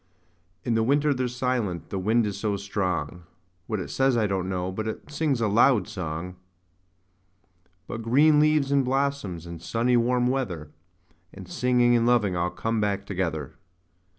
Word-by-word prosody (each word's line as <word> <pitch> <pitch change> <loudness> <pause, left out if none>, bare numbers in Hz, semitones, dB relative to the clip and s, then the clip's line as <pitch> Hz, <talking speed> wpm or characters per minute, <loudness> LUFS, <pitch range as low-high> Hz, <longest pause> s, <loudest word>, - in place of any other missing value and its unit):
In 120 - 0
the 115 - +2
winter 145 +5 +2
they're 130 -1 -1
silent 120 -7 -2
the 95 - -2
wind 110 +4 +2
is 100 -2 -3
so 100 0 -1
strong; 95 -3 -3 0.5
What 110 -2 -2
it 95 - -6
says, 135 -2 +2
I 110 - +2
don't 95 -2 -1
know, 90 0 -2
but 110 +4 -4
it 110 +6 -6
sings 145 -5 0
a 110 - +2
loud 105 0 +4
song. 90 -3 -5 1.5
But 115 - -6
green 145 +7 +4
leaves, 150 -2 +3
and 140 -1 +3
blossoms, 130 - -1
and 85 -1 -8
sunny 120 +7 +1
warm 125 +1 +2
weather, 95 - -2 0.4
5 85 - -35 0.2
And 95 -2 -10
singing, 120 +2 +2
and 115 0 +2
loving 110 -7 +2
all 90 0 0
come 115 +3 -2
back 100 -1 -1
together. 85 -7 -3
110 Hz, 170 wpm, -26 LUFS, 95-125 Hz, 1.5 s, loud